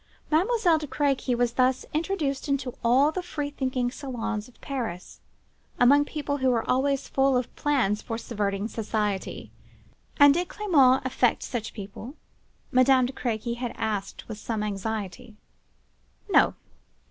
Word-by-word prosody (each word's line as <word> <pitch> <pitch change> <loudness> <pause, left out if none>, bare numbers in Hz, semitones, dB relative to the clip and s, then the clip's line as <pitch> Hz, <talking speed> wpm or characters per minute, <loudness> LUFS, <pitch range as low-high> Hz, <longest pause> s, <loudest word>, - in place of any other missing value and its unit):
Mademoiselle 350 0 +3
de 300 - -6
Crequy 275 -2 0
was 240 0 +1
thus 255 +1 +2
introduced 310 -4 -1
into 275 -3 -1
all 260 +6 +4
the 370 - -3
free 300 -5 -4
thinking 260 -3 -1
salons 230 -6 -4
of 250 - -21
Paris; 230 -10 -5 0.6
among 285 +4 +6
people 290 -1 -3
who 260 -1 +2
were 235 -3 0
always 270 +1 +1
full 270 -1 +2
of 250 - -4
plans 255 -9 +1
for 225 -2 -4
subverting 205 -3 -2
society. 210 -3 -3 0.7
'And 285 0 +8
did 350 +3 -1
Clement 275 -13 +3
affect 250 -2 +1
such 230 -3 -5
people?' 210 +6 -8 0.6
Madame 255 0 +5
de 255 - -4
Crequy 235 -1 -3
had 245 -1 -4
asked 210 -3 -3
with 220 -2 -7
some 220 -1 -3
anxiety. 210 +2 -4 1.0
No! - - +5
255 Hz, 140 wpm, -26 LUFS, 225-285 Hz, 1.0 s, And